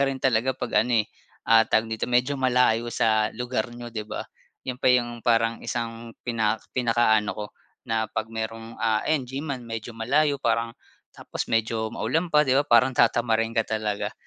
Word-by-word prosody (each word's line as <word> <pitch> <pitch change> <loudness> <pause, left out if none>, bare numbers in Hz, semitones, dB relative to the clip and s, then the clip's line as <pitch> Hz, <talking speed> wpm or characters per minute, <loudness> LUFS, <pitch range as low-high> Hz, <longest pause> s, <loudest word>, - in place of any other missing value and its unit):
ka 140 - +3
rin 135 - -2
talaga 130 0 +1
'pag - - -5
ano, 115 -1 +2
eh, - - -25 0.4
ah 115 0 +5
tawag 110 - +3
dito 110 - -2
medyo 125 +3 +2
malayo 125 -2 +2
sa 110 -2 +2
lugar 125 -2 -2
n'yo, 120 -1 -8
'di 110 -2 -5
ba? - - -5 0.4
'Yon 125 0 -5
pa - - +3
yung 120 -2 +2
parang 115 0 +1
isang 115 -1 -5
pinak 110 -2 0
pinakaano 115 -4 +2
ko 105 - -4 0.4
na 110 -1 +1
'pag 110 - -3
mayrong, 115 0 -6
ah, 110 -1 +1
ayan, 150 -5 +1
gyman, 135 0 -5
medyo 115 0 -6
malayo 140 +5 +2
parang 115 -3 -1 0.4
tapos - - -5
medyo 110 0 0
maulan 155 +11 -1
pa, 150 -2 +4
'di 130 - +1
ba? - - +2
Parang 120 +3 +5
tatamarin 115 -2 +2
ka 115 - +3
talaga. 110 -2 -2
115 Hz, 180 wpm, -25 LUFS, 110-125 Hz, 0.4 s, ah